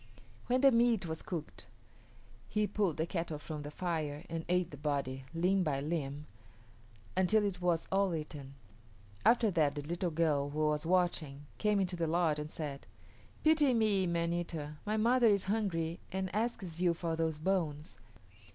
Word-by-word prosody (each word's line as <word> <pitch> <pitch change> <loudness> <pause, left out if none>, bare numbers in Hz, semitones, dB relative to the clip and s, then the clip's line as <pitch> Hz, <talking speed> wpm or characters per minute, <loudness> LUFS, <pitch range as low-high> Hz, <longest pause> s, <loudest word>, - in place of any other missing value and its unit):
When 255 +1 +2
the 275 -1 +7
meat 230 -4 +3
was 160 -1 -4
cooked 165 -5 -6 0.8
he 210 0 +1
pulled 200 -5 0
the 160 - 0
kettle 165 -3 -3
from 150 0 -6
the 145 - -6
fire 155 -2 -3
and 165 0 -3
ate 180 -1 +1
the 145 - -8
body, 140 -2 -2
limb 180 +4 +2
by 150 -6 0
limb, 145 -1 -3 0.9
until 205 +3 +3
it 185 -3 -3
was 175 -2 +1
all 195 -2 +2
eaten. 145 -3 -7 0.7
After 230 -3 +4
that 155 -4 +2
the 145 - -4
little 175 +4 -2
girl 155 -3 +1
who 155 +1 0
was 150 +1 -1
watching 165 -6 0
came 210 -1 +2
into 185 -2 0
the 170 -1 -1
lodge 160 -2 +2
and 150 0 -5
said, 145 -3 -6 0.6
"Pity 305 -5 +5
me, 205 -4 +2
man 170 0 0
eater, 155 -3 -4
my 215 +1 +1
mother 240 +2 +4
is 200 -3 +3
hungry 180 -6 -1
and 190 0 -3
asks 210 -7 -2
you 175 -2 +3
for 165 -1 -2
those 160 -1 -1
bones." 155 -3 -2
170 Hz, 170 wpm, -33 LUFS, 150-195 Hz, 0.9 s, the